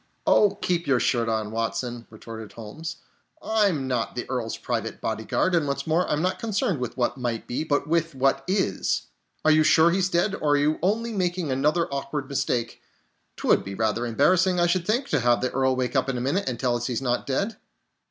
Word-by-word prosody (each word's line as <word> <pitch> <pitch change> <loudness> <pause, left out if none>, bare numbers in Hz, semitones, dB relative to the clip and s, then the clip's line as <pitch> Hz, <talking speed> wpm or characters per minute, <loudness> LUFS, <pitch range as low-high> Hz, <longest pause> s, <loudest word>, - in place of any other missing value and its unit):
"Oh, 205 -1 +4
keep 175 -3 0
your 130 -3 +3
shirt 120 -2 +1
on, 110 -1 -1
Watson," 115 +1 -3
retorted 110 0 -9
Holmes, 145 +9 -7 0.4
"I'm 200 -11 +1
not 125 -3 -1
the 120 - -4
Earl's 120 -3 -3
private - - -3
bodyguard, 185 - -1
and 165 -4 +2
what's 140 0 -2
more, 165 +3 +1
I'm 150 +2 0
not 185 - 0
concerned 200 - -1
with 125 +1 -4
what 125 +1 0
might 120 -2 -2
be, 125 - -2
but 145 -2 0
with 165 -1 0
what 135 +1 +1
is. 190 +1 0 0.4
Are 155 - +6
you 155 0 +5
sure 160 +2 +5
he's 190 +1 +1
dead, 180 +3 +1
or 150 -7 +1
are - - +4
you 150 +2 +1
only 225 +6 0
making 180 -5 -1
another 150 +6 +1
awkward 140 0 -3
mistake? 135 -4 -2 0.6
'Twould - - +2
be 95 0 -6
rather 110 +3 0
embarrassing, 180 +9 +3
I 175 - +4
should 175 0 0
think, 240 +6 +1
to 145 - +2
have 120 0 +3
the 125 - -1
Earl 130 0 +1
wake 125 0 -2
up 130 0 +2
in 130 - -1
a - - -3
minute 145 +7 0
and 120 -2 -4
tell 125 -2 +1
us 120 0 -2
he's 125 -3 -1
not 125 -1 -1
dead!" 200 +12 -1
140 Hz, 210 wpm, -25 LUFS, 120-175 Hz, 0.6 s, Are